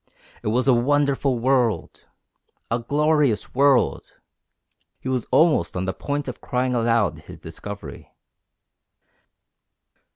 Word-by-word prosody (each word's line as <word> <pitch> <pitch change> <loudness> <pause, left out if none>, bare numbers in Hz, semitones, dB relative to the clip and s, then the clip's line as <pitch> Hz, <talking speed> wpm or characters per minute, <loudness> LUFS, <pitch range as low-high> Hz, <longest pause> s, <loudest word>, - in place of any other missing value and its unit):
It - - -6
was 125 +5 +1
a 130 - +6
wonderful 140 +1 +1
world! 120 -6 0 0.6
A 115 - +1
glorious 145 -1 +1
world! 135 -1 +3 1.0
He - - -8
was 130 -3 -1
almost 150 - +3
on 90 - -2
the 95 - -2
point 145 0 -4
of 125 - -7
crying 125 0 -1
aloud 115 -8 +1
his - - -10
discovery. 100 -9 -9
125 Hz, 110 wpm, -23 LUFS, 115-140 Hz, 1.0 s, a